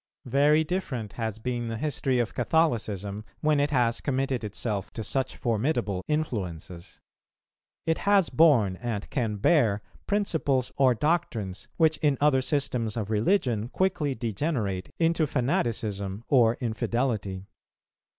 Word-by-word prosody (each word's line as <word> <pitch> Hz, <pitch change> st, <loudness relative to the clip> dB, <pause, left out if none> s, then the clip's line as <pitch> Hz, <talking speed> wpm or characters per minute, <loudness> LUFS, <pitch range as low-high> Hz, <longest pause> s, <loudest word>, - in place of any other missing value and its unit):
Very 145 Hz, +5 st, +4 dB
different 140 Hz, -, -3 dB
has 110 Hz, -1 st, -3 dB
been 120 Hz, +1 st, -3 dB
the 115 Hz, 0 st, -3 dB
history 135 Hz, -2 st, 0 dB
of 120 Hz, -1 st, 0 dB
Catholicism, 110 Hz, -, 0 dB, 0.2 s
when 150 Hz, -1 st, +3 dB
it 145 Hz, +1 st, +2 dB
has 120 Hz, -5 st, +1 dB
committed 135 Hz, -3 st, -1 dB
itself 105 Hz, -1 st, -3 dB
to 110 Hz, -, -4 dB
such 135 Hz, +4 st, -1 dB
formidable 115 Hz, -5 st, -1 dB
influences. 95 Hz, -, -4 dB, 0.9 s
It 160 Hz, 0 st, +1 dB
has 200 Hz, -4 st, +3 dB
borne, 120 Hz, -, +4 dB
and 115 Hz, -3 st, -4 dB
can 115 Hz, -6 st, -1 dB
bear, 105 Hz, -, +2 dB, 0.2 s
principles 160 Hz, -, 0 dB
or 130 Hz, -3 st, +4 dB
doctrines, 115 Hz, -, -1 dB
which 160 Hz, -1 st, +3 dB
in 145 Hz, -3 st, +1 dB
other 145 Hz, -3 st, +4 dB
systems 130 Hz, -6 st, -1 dB
of 110 Hz, -1 st, -3 dB
religion 115 Hz, -, +1 dB
quickly 150 Hz, -3 st, 0 dB
degenerate 110 Hz, -, -2 dB
into 165 Hz, -1 st, +2 dB
fanaticism 110 Hz, -6 st, -1 dB
or 120 Hz, -4 st, +4 dB
infidelity. 110 Hz, -5 st, -2 dB
120 Hz, 125 wpm, -27 LUFS, 105-150 Hz, 0.9 s, Very